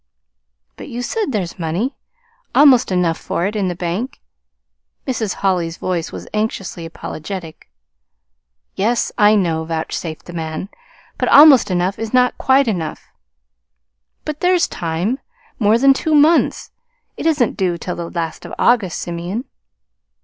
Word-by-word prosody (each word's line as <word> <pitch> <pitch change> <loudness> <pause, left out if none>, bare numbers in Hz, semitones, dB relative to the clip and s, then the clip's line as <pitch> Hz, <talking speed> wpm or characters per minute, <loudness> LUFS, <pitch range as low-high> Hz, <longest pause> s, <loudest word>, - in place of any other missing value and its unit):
"But - - -9
you 245 -1 -5
say 440 - -1
there's 195 - -3
money 175 - -2 0.6
almost 270 -8 +6
enough 180 -3 +1
for 175 - -2
it 205 +3 -2
in 200 -3 0
the 175 - -2
bank." 185 +9 -4 0.9
Mrs. 225 -6 -2
Holly's 175 -3 0
voice 175 -3 -3
was - - -8
anxiously 205 -5 -3
apologetic. 165 - -8 1.0
"Yes, 230 +5 0
I 210 -1 +5
know" 165 -5 +1
vouchsafed 160 0 -4
the 175 - -10
man. 160 +3 -5 0.5
"But - - +1
almost 285 -8 +8
enough 180 +1 0
is 225 +2 -3
not 250 0 +3
quite 265 0 +3
enough." 170 -8 -3 1.2
"But 300 -1 -4
there's 360 0 +3
time 175 +10 -2 0.4
more 215 0 +4
than 275 +3 +5
two 310 +3 0
months. 310 +3 +3 0.4
It - - -2
isn't 285 -8 +2
due 180 -3 0
till 180 +1 -5
the 170 -1 -5
last 165 -2 -4
of - - -8
August, 225 -8 +2
Simeon." 175 +8 -4
195 Hz, 140 wpm, -18 LUFS, 170-250 Hz, 1.2 s, almost